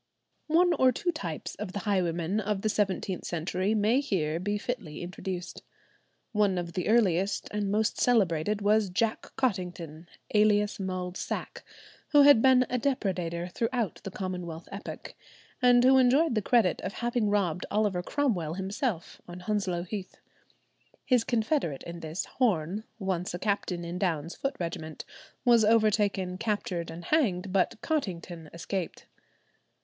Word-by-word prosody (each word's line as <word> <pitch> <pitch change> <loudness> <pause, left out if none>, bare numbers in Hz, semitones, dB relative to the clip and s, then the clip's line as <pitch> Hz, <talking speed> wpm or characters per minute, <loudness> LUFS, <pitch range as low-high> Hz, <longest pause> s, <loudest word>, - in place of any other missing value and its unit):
One 345 +3 +4
or 260 -4 +4
two 350 +8 -1
types 170 - -5
of 200 -2 -5
the 200 - -3
highwaymen 180 -1 0
of 210 -1 -2
the 215 - +2
seventeenth 195 -3 -1
century 180 +5 -1
may 220 +5 +3
here 165 - -1
be 205 +3 -1
fitly 200 -9 -5
introduced. 180 0 -6 0.7
One 205 -4 +2
of 170 -1 -4
the 180 - -2
earliest 195 -4 +2
and 210 -1 -1
most 215 +2 +1
celebrated 205 -3 +2
was 210 -1 +3
Jack 220 +4 -1
Cottington, 175 - -2 0.3
alias 210 -1 +3
"Mulled 185 -1 -3
Sack," - - -5 0.5
who 290 -1 +8
had 285 -5 +8
been 260 0 +6
a 250 - -1
depredator 180 -9 -1
throughout 230 -2 -2
the - - -4
Commonwealth 180 -4 -5
epoch, 200 +2 -7 0.5
and 245 -1 +6
who 265 +1 +6
enjoyed 265 +4 +4
the 215 - +1
credit 225 -3 +2
of - - -4
having 240 -2 0
robbed 180 -5 0
Oliver 205 -4 +1
Cromwell 180 - -1
himself 195 - -3
on 175 +1 -9
Hounslow 185 -3 -1
Heath. 185 0 -6 0.9
His 250 -4 +3
confederate 225 - 0
in 170 0 -7
this, 160 +3 -4
Horne, 205 -4 0
once 185 -4 -2
a - - -2
captain 185 -3 -1
in 175 +1 -4
Downe's 170 -4 -1
foot 275 - -2
regiment, 160 -2 -5 0.4
was 235 -2 +6
overtaken, 210 -4 +2
captured, 200 -6 -2
and 165 +1 -8
hanged, 200 - +1
but 195 +2 +1
Cottington 175 - -3
escaped. 170 +1 -4
195 Hz, 145 wpm, -28 LUFS, 175-225 Hz, 0.9 s, who